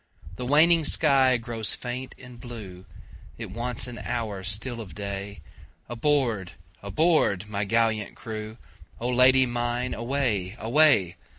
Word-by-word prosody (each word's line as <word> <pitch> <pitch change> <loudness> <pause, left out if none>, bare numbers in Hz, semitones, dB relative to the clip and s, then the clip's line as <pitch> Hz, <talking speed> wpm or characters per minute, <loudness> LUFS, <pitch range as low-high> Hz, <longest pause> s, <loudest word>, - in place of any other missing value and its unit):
The 125 - -5
waning 160 +4 +5
sky 135 -4 +4
grows 115 -2 -2
faint 125 +1 -6
and 125 -2 -13
blue, 105 -7 -9 0.5
It - - -7
wants 120 0 -2
an 120 -1 -6
hour 110 -5 -4
still 110 +5 -2
of 90 -8 -10
day, 100 0 -6 0.5
Aboard! 120 - -1 0.3
aboard! 105 - +1
my 100 -1 -3
gallant 110 -1 0
crew,O 110 -1 -8
Lady 130 +1 +5
mine 120 +1 -2
away! 115 -7 -1
away! 115 - +3
115 Hz, 120 wpm, -25 LUFS, 100-125 Hz, 0.5 s, waning